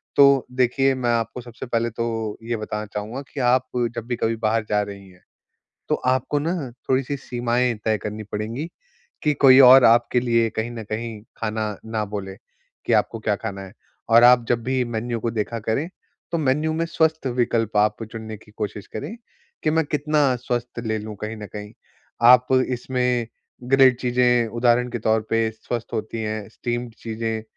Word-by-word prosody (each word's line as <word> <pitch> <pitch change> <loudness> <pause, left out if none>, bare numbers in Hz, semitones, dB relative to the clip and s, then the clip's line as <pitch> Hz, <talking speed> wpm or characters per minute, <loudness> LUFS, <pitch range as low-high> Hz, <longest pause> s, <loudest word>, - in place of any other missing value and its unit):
तो 140 -2 +6
देखिए 130 +2 +2
मैं 125 -2 -1
आपको 115 +1 -1
सबसे 120 -1 -9
पहले 115 -1 0
तो 115 -2 -3
ये 115 0 -2
बताना 105 0 -4
चाहूँगा 110 +6 -4
कि 145 - -5
आप 130 0 +2 0.3
जब 115 -1 -5
भी 120 - -1
कभी 115 -1 0
बाहर 110 0 0
जा 105 0 +2
रही 100 -1 -8
हैं। 90 0 -21 0.7
तो - - +3
आपको 130 +3 0
न 155 -4 -3 0.2
थोड़ी-सी 135 +2 +1
सीमाएँ 120 -1 0
तय 110 -1 +2
करनी 105 +1 -6
पड़ेंगी 115 +9 -3 0.6
कि 150 - +3
कोई 135 -2 +7
और 130 0 +9
आपके 120 +2 +4
लिए 115 -2 +2
कहीं 110 +2 -3
न 115 -2 -6
कहीं 110 0 -4 0.2
खाना 110 -1 -2
ना 110 -1 -2
बोले 100 -2 -6 0.5
कि - - +1
आपको 115 - +1
क्या 110 -1 0
खाना 100 -2 -6
है, 95 0 -10 0.4
और 115 +1 +7
आप 120 -1 +6
जब 120 -1 +1
भी 130 0 0
मेन्यू 120 0 -3
को 115 +1 -2
देखा 115 +1 -3
करें, 115 +9 -2 0.4
तो 170 - 0
मेन्यू 150 +1 +1
में 165 +1 -1
स्वस्थ 160 -3 0
विकल्प 115 -3 0
आप 105 +2 +2
चुनने 110 -1 -7
की 105 0 -20
कोशिश 105 -2 -5
करें 110 - -6 0.5
कि 155 - +2
मैं 160 +1 +2
कितना 150 -2 +1
स्वस्थ 120 -1 -4
ले 110 0 0
लूँ 105 0 -7
कहीं 110 +1 -4
न 105 - -7
कहीं? 105 0 -7 0.5
आप 125 +1 +7 0.2
इसमें 125 -1 -1 0.4
ग्रिल्ड 135 -2 +6
चीज़ें 125 -1 +2
उदाहरण 120 +2 +2
के 120 - -3
तौर 110 0 +2
पे 115 0 +2
स्वस्थ 115 +1 -6
होती 110 +1 -3
हैं, 110 -1 -4
स्टीम्ड 120 +1 -4
चीज़ें 110 -1 -3
115 Hz, 180 wpm, -23 LUFS, 110-125 Hz, 0.7 s, और